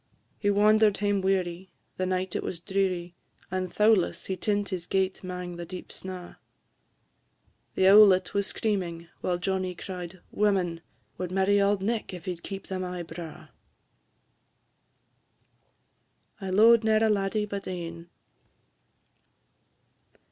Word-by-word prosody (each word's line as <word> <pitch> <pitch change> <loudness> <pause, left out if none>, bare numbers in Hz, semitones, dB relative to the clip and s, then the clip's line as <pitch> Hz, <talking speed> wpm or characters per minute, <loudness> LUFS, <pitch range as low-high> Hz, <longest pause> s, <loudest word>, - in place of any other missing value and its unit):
He 205 - +1
wander'd 210 +1 +4
hame 205 -1 +1
weary, 185 -1 -1 0.3
the 185 - -1
night 185 0 -2
it - - 0
was 170 - -4
dreary; 180 -1 -1 0.4
And, 185 -1 -2
thowless, 210 -3 +2
he 190 - -2
tint 205 +2 -1
his 180 -2 -4
gate 190 0 0
'mang 180 -1 -5
the 175 - -5
deep 180 +1 -8
snaw; 185 -2 -8 1.4
The 190 - +4
owlet 195 -2 +7
was 200 0 0
screamin' 175 -6 -2
while 180 -1 -1
Johnnie 185 0 -2
cried, 180 0 -7
"Women 185 -5 +1 0.4
Wad 180 -1 -3
marry 195 +2 +3
Auld 200 -1 +2
Nick 220 -2 -2
if 180 - -10
he 185 - -1
'd 170 - -14
keep 195 0 -7
them 185 -1 -4
aye 180 -1 -4
braw." 165 -1 -9 2.9
I 190 - -4
LO'ED 225 +4 +6
NE'ER 220 0 +3
A - - +4
LADDIE 210 0 +1
BUT 200 -1 -6
ANE. 170 -2 -6
190 Hz, 135 wpm, -27 LUFS, 180-200 Hz, 2.9 s, owlet